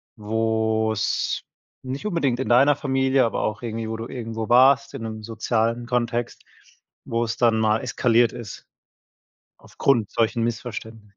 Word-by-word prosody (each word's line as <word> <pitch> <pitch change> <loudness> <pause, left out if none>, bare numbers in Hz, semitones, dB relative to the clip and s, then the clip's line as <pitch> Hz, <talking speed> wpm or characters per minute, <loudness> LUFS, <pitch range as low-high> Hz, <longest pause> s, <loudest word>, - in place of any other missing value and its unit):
wo 110 0 0
es 105 0 -1 0.4
nicht 130 +7 -5
unbedingt 145 -11 0
in 130 - -2
deiner 135 +4 +5
Familie, 135 -2 +2
aber 115 - -2
auch 105 -1 -2
irgendwie 115 -1 -4
wo 110 - -3
du 115 - -6
irgendwo 115 -3 -5
warst 130 +3 +5
in 115 - -6
'nem 110 -1 -6
sozialen 115 +1 -1
Kontext, 120 -1 -2 0.6
wo 115 +1 -1
es 115 - -3
dann 115 -2 +2
mal 110 0 +2
eskaliert 120 -1 +2
ist 120 -4 -9 0.9
aufgrund 120 -7 0
solchen 115 0 0
Missverständni 110 -2 -5
115 Hz, 145 wpm, -23 LUFS, 110-125 Hz, 0.9 s, deiner